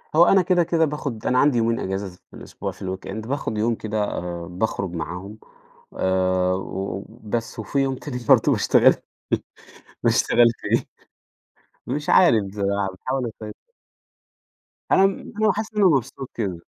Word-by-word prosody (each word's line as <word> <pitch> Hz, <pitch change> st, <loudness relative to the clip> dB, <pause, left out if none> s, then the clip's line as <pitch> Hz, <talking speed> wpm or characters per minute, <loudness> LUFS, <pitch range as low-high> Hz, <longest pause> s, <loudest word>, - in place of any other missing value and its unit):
هو 170 Hz, -, +7 dB
أنا 195 Hz, +1 st, +5 dB
كده 180 Hz, -1 st, +3 dB
كده 165 Hz, -1 st, +2 dB
باخد 140 Hz, -6 st, -5 dB
أنا 130 Hz, 0 st, +3 dB
عندي 140 Hz, -4 st, +4 dB
يومين 115 Hz, 0 st, +1 dB
إجازة 95 Hz, +1 st, -3 dB
في -, -, -32 dB
الأسبوع -, -, -6 dB
في -, -, -18 dB
الweekend 95 Hz, +4 st, -5 dB
باخد 135 Hz, -5 st, -2 dB
يوم 115 Hz, +2 st, +1 dB
كده 110 Hz, -1 st, -2 dB
آآ، 85 Hz, -3 st, -4 dB
باخرج 95 Hz, -1 st, -2 dB
معاهم 90 Hz, +5 st, -6 dB, 0.6 s
آآ، 95 Hz, 0 st, +1 dB
وبس 105 Hz, +5 st, -5 dB
وفي 140 Hz, +6 st, -2 dB
يوم 135 Hz, -1 st, +1 dB
تاني 130 Hz, -1 st, -6 dB
برضه -, -, +6 dB
باشتغل -, -, +5 dB, 1.1 s
باشتغل 120 Hz, -, +4 dB
فيه -, -, 0 dB, 1.0 s
مش 150 Hz, +1 st, -2 dB
عارف 105 Hz, -, +4 dB
آآ، 100 Hz, 0 st, 0 dB
باحاول 130 Hz, +1 st, -2 dB
اسيطر. 105 Hz, 0 st, -9 dB, 1.4 s
أنا 195 Hz, 0 st, +4 dB, 0.4 s
حاسس 215 Hz, +1 st, -4 dB
إن 210 Hz, -, +2 dB
أنا -, -, +6 dB
مبسوط 135 Hz, -1 st, -1 dB
كده، 95 Hz, -7 st, -3 dB
110 Hz, 140 wpm, -23 LUFS, 95-135 Hz, 1.4 s, هو